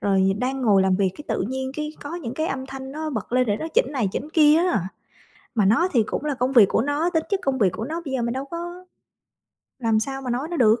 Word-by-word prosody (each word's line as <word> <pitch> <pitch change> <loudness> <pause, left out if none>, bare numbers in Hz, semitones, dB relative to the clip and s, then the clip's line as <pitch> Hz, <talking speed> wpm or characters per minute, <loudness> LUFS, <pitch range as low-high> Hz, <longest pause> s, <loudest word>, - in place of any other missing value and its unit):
rồi 195 -1 +3
đang 260 +2 -1
ngồi 200 -4 +4
làm 190 -1 +2
việc 195 -2 +2
cái 295 - -8
tự - - 0
nhiên 265 0 -3
cái 300 0 -3
có 290 +4 -6
những 260 -8 -5
cái 315 +3 -1
âm 265 -1 -3
thanh 265 0 -8
nó 310 +1 -4
bật 220 -2 -5
lên 255 -1 +3
để 205 -1 +1
nó 320 - -4
chỉnh 485 - +4
này 245 -8 0
chỉnh 300 - -4
kia 305 -1 +6
á. 220 - +1 0.7
Mà 210 -3 +3
nó 235 - +4
thì 230 -3 +4
cũng 270 - -4
là 295 - 0
công 255 +2 0
việc 225 -5 +8
của - - +2
nó, 290 +6 0
tính 320 -2 0
chất 395 - +1
công 270 -1 0
việc 200 -6 +4
của 220 +3 -4
nó 325 +4 -4
bây 270 - -4
giờ 255 - 0
mình 235 0 -1
đâu 265 +2 -4
có 345 +3 -7 0.9
làm 225 -3 +2
sao 270 +3 -4
mà 250 - -4
nói 260 +6 -2
nó 345 - -3
được 225 -2 +4
265 Hz, 280 wpm, -23 LUFS, 225-305 Hz, 0.9 s, việc